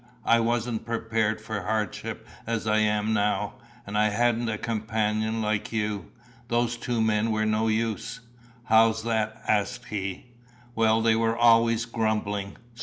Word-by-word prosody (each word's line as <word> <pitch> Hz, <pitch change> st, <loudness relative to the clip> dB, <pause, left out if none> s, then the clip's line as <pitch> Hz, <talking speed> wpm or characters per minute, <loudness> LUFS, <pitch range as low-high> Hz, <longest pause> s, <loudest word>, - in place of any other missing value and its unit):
I 115 Hz, -, +5 dB
wasn't 115 Hz, 0 st, -1 dB
prepared 115 Hz, -1 st, -1 dB
for 110 Hz, -1 st, -4 dB
hardship 105 Hz, 0 st, -3 dB, 0.2 s
as 115 Hz, -1 st, -2 dB
I 110 Hz, 0 st, +2 dB
am 105 Hz, 0 st, +1 dB
now, 105 Hz, +1 st, 0 dB, 0.3 s
and 100 Hz, -, -6 dB
I 105 Hz, 0 st, +3 dB
hadn't 120 Hz, +2 st, +1 dB
a 110 Hz, -, -2 dB
companion 110 Hz, -1 st, -1 dB
like 105 Hz, -1 st, -1 dB
you. 105 Hz, -4 st, -2 dB, 0.4 s
Those 120 Hz, 0 st, +1 dB
two 120 Hz, -1 st, -1 dB
men 110 Hz, 0 st, +1 dB
were 110 Hz, 0 st, +1 dB
no 110 Hz, +1 st, +1 dB
use." 110 Hz, +2 st, -1 dB, 0.4 s
"How's 110 Hz, -1 st, +4 dB
that?" 110 Hz, -1 st, -1 dB
asked 105 Hz, -2 st, 0 dB
he. 95 Hz, -3 st, -4 dB, 0.5 s
"Well, 110 Hz, -1 st, +3 dB
they 115 Hz, -1 st, +4 dB
were 115 Hz, 0 st, +1 dB
always 115 Hz, -1 st, +4 dB
grumbling." 105 Hz, -3 st, -2 dB
110 Hz, 145 wpm, -26 LUFS, 105-115 Hz, 0.5 s, I